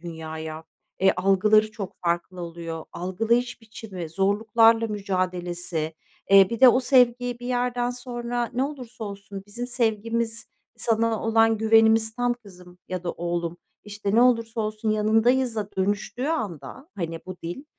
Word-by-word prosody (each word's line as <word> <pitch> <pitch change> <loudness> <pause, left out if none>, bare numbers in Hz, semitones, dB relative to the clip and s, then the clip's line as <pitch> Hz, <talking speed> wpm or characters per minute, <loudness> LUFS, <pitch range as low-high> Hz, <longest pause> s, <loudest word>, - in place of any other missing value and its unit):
dünyaya, 160 -1 -7 0.4
eee, 190 0 +5
algıları 210 +3 +3
çok 205 -4 -7
farklı 175 +1 -1
oluyor, 165 -1 -6
algılayış 225 +8 -1
biçimi, 210 -6 -8
zorluklarla 225 +5 +3
mücadelesi, 180 -5 -3 0.4
eee, 195 -1 +7
bir 230 - -4
de 260 - +10
o 250 +1 +5
sevgi 245 -2 +3
bir 245 - -7
yerden 245 -1 0
sonra, 240 -1 -4
"Ne 250 +2 0
olursa 250 -5 -6
olsun 200 -1 -8
bizim 240 +4 -6
sevgimiz, 230 -1 -1 0.3
sana 225 -1 0
olan 225 0 +3
güvenimiz 220 0 +4
tam 245 0 +1
kızım." 180 -6 -16
ya 185 -1 -4
da 175 - -2
oğlum, 170 0 -3 0.3
işte, 205 -1 -3
"Ne 235 - +6
olursa 230 -2 +2
olsun 215 0 -2
yanındayız."a 220 +1 +2
dönüştüğü 205 +6 -1
anda, 215 - -4
hani, 165 -2 -4
bu 185 -1 -7
dil, 175 - -6
215 Hz, 140 wpm, -25 LUFS, 185-235 Hz, 0.4 s, de